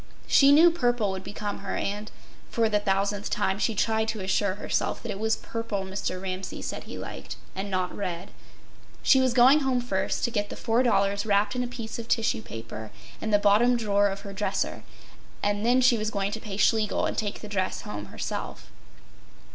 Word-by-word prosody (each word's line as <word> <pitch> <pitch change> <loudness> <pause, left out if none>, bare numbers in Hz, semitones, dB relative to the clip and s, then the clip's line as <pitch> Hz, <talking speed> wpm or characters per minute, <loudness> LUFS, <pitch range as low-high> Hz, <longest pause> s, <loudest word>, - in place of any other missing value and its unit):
She 275 0 +6
knew 325 +4 +7
purple 245 - +1
would 190 0 -5
become 205 0 -5
her, - - -4
and—for 215 +2 -3
the 210 -1 +2
thousandth 200 0 0
time 195 -1 0
she 225 0 +1
tried 220 +2 +1
to 220 -2 -3
assure 190 0 +1
herself - - -2
that 235 - -4
it 195 - -5
was 220 +1 +2
purple 230 -4 -4
Mr. 190 -1 -3
Ramsay 185 0 -5
said - - -5
he - - -7
liked - - -7 0.2
and 195 +2 -3
not 185 -2 -1
red. 180 -1 -4 0.7
She 265 - +6
was 260 -1 +3
going 255 +5 +6
home 265 -3 +1
first 200 -6 -1
to 240 - +1
get 205 -3 -1
the - - -6
$4 215 -4 +2
wrapped 205 +1 +2
in 250 - 0
a - - -3
piece 235 -2 -6
of 230 - -6
tissue 220 - +1
paper 115 -1 -8 0.3
in 220 - -2
the 210 - +5
bottom 210 +4 +4
drawer 205 -3 +2
of 195 0 -4
her 200 - -8
dresser, 205 +1 -2 0.6
and 205 0 0
then 245 +2 +4
she 245 -2 +4
was 215 0 -1
going 200 -2 -1
to 220 - -4
pay 205 -3 -6
Schlegel 215 -1 +2
and - - -2
take 205 -2 -3
the 210 - -7
dress 190 -3 -2
home 105 -1 -6
herself. - - -6
210 Hz, 195 wpm, -27 LUFS, 195-230 Hz, 0.7 s, knew